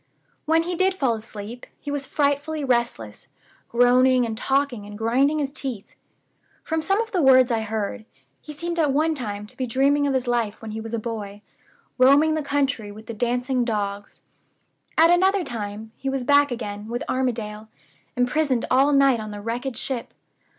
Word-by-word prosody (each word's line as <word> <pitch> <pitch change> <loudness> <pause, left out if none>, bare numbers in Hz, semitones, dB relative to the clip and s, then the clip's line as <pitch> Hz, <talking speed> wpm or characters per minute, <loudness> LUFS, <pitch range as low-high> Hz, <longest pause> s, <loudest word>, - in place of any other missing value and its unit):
When 325 +1 +3
he 355 +2 -3
did 375 +2 +1
fall 265 -9 +1
asleep, 220 +1 -8
he 290 - -6
was 285 -1 -3
frightfully 290 +1 0
restless; 235 - -1 0.4
groaning 250 +1 +4
and 225 -1 -3
talking 265 -3 -1
and 205 0 -9
grinding 260 +7 +2
his 280 -2 -2
teeth. 255 -9 -5 0.7
From 320 0 -1
some 390 +5 +1
of 455 0 -6
the 365 - +1
words 260 -2 +6
I 230 - +1
heard, 220 +1 -4 0.4
he 300 - -9
seemed 340 +3 -4
at 300 -3 +3
one 310 +4 +2
time 210 -7 -5
to 210 - -15
be 255 - -3
dreaming 280 +4 +2
of 275 - 0
his 260 -1 0
life 235 -3 -1
when 220 -1 -7
he 220 +1 -5
was 225 +1 -4
a - - -2
boy, 210 -2 -6 0.6
roaming 285 +5 +5
the 310 - 0
country 280 -7 -1
with 215 +2 -12
the 230 - -6
dancing 245 +3 0
dogs. 205 -3 -4 0.7
At 330 +2 +6
another 380 +2 +3
time 220 -4 -6
he 270 - -3
was 270 -1 -2
back 285 +2 +4
again 210 -4 -5
with 240 +2 -3
Armadale, 220 -4 -2 0.5
imprisoned 255 0 +1
all 270 +3 +4
night 275 -3 +4
on 215 0 -6
the 205 0 -7
wrecked 235 +3 -4
ship. 255 -4 -4
250 Hz, 180 wpm, -23 LUFS, 220-285 Hz, 0.7 s, words